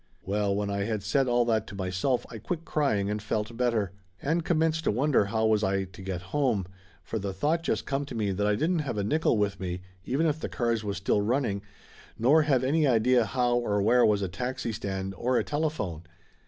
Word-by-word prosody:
Well, 100 0 0
when 100 0 -1
I 100 0 -1
had 110 -2 -2
said 130 +6 +2
all 120 0 +3
that 110 -2 +1
to - - -8
myself 95 +7 -1
I 115 - -7
quit 165 - -4
crying 110 -10 +1
and 105 +1 -2
felt 110 +1 -2
better, 115 -5 +1 0.3
and 160 +4 0
commenced 160 -1 +1
to - - +3
wonder 130 0 +2
how 110 +2 0
was 110 -1 +3
I 95 0 +1
to 95 0 -11
get 95 -1 -4
home, 125 -10 +1 0.4
for 110 - -3
the 100 -1 -3
thought 150 - +1
just - - -1
come 140 0 -1
to 130 - -7
me 105 -3 0
that 100 +2 0
I 105 - +3
didn't 165 - +1
have 135 -7 -3
a 100 - 0
nickel 150 +2 +2
with 100 -2 0
me 90 0 -4 0.2
even 135 +10 0
if 155 -1 +1
the - - -4
cars 115 -3 0
was 100 -1 -3
still 100 +1 +1
running, 110 -2 0 0.6
nor 140 +8 +5
have 135 -4 +2
any 150 +3 +2
idea 120 0 +4
how 120 0 +1
or 105 -4 0
where 125 +3 +5
was 105 -2 +3
a - - 0
taxi 120 +6 -3
stand 95 -2 -4
or 125 +6 0
a - - +2
telephone. 145 - -2
110 Hz, 220 wpm, -28 LUFS, 100-135 Hz, 0.6 s, nor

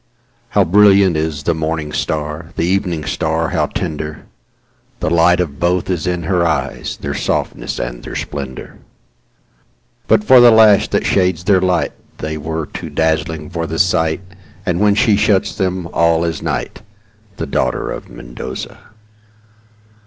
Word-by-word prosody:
How 100 - +6
brilliant 100 0 +5
is 75 -2 -2
the 85 - +1
morning 80 -1 -3
star, 75 +1 -3
The - - 0
evening 90 -4 -1
star 80 +1 -1
how - - 0
tender,—The 75 0 -7
light 85 +1 +4
of 75 -6 -2
both 90 +1 0
is 90 -2 -2
in 90 -1 -1
her 90 +1 +1
eyes, 80 -3 -2
Their - - -4
softness - - -2
and - - -4
their - - -8
splendor. 70 -3 -6 1.3
But - - +4
for 130 +3 +7
the 120 0 +8
lash 110 -3 +6
that - - -1
shades 90 -3 +1
their 95 -1 +3
lightThey 80 -3 -2
were 80 +1 -3
too - - -8
dazzling 80 0 -1
for 85 -1 -3
the 80 - -4
sight, 80 -2 +1 0.4
And 90 -1 0
when 105 0 +3
she 110 -1 +3
shuts 105 -2 +2
them, 95 -3 -2
all 85 0 +3
is 85 -1 -2
night—The 70 -7 -7
daughter - - -1
of - - -7
Mendoza. - - -8
85 Hz, 145 wpm, -17 LUFS, 80-95 Hz, 1.3 s, the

